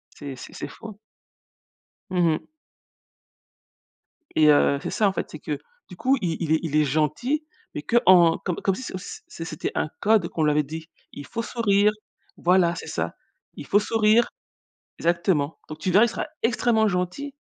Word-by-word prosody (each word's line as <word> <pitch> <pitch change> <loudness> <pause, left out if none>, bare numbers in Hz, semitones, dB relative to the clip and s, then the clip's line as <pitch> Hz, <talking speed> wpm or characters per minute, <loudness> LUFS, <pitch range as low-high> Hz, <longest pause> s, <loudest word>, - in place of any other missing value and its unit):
C'est 140 -2 -7
c'est - - -11
c'est - - -6
fou, 225 - -11
hein. 205 - -10 1.2
Mmh 175 -2 +2
mh. 155 - +1 1.9
Et 155 -1 +5
heu, 140 -1 +4
c'est - - -4
ça, 210 - +2
en 190 - 0
fait, - - -4
c'est - - -9
que - - -4 0.3
du 180 - -10
coup 270 +2 +2
il 165 -3 -1
il 160 -3 -2
il - - +6
est 160 - +3
il 155 -2 -2
est 155 - +5
gentil 155 - 0 0.3
mais 145 - -4
qu'en 175 -4 +5
comme 180 -3 -3 0.2
si 260 - -7
comme 185 - -5
si, - - -9
c'était 165 - -7
un - - -7
c'était 155 - -4
un 155 - -1
code 210 -5 +3
qu'on 160 - -1
lui 150 - +4
avait 150 0 +2
dit. 160 +3 -8 0.2
Il 145 - -8
faut 230 - -4
sourire 210 -3 +2 0.5
voilà 175 -1 +3
c'est - - -7
ça. - - -3 0.4
Il - - -8
faut 205 - +3
sourire 220 +2 +3 0.7
exactement, 170 -3 0
donc 155 0 -8
tu 185 - -1
verras, 205 +5 +6
il - - -1
sera - - -4 0.2
extrêmement 230 -2 +2
gentil, 180 +11 -3
180 Hz, 190 wpm, -24 LUFS, 155-220 Hz, 1.9 s, il